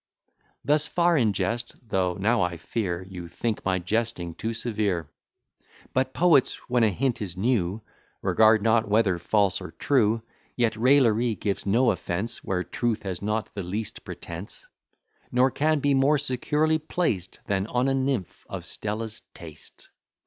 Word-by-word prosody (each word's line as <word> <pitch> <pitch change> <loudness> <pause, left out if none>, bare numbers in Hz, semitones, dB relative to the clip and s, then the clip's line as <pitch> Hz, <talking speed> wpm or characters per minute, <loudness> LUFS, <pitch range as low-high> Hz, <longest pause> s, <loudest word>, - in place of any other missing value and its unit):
Thus 150 0 +3
far 175 +1 +2
in 115 -8 +3
jest: 115 +4 -2
though 90 -3 0
now, 110 +6 +2
I 90 -2 0
fear, 90 +1 -3
You 90 -2 -8
think 110 +6 -3
my 95 -1 +1
jesting 95 -2 -1
too 110 +7 -3
severe; 105 -8 -1 0.9
But 130 0 +1
poets, 155 -3 +4
when 125 -1 +2
a 110 - +5
hint 120 +5 -1
is 95 -3 -5
new, 105 -2 0 0.4
Regard 110 -1 +4
not 110 -1 +3
whether 105 -4 +3
false 100 +1 +1
or - - -7
true: 115 -5 +2 0.3
Yet 115 -3 +1
raillery 120 -2 +3
gives 100 -1 -3
no 120 +5 +4
offence, 90 +5 -3
Where 90 -1 -1
truth 120 +1 -2
has 95 -3 -4
not 105 +2 -2
the 100 - -4
least 100 +4 -5
pretence; 85 +4 -8 0.6
Nor 130 +2 +3
can 155 +3 +1
be 145 0 +2
more 135 +3 +4
securely 150 +4 +1
placed 150 - -2
Than 100 0 -1
on 125 +3 +1
a 135 - +2
nymph 130 -7 -2
of - - -6
Stella's 110 +1 -4
taste. 80 -3 -12
110 Hz, 155 wpm, -26 LUFS, 95-130 Hz, 0.9 s, a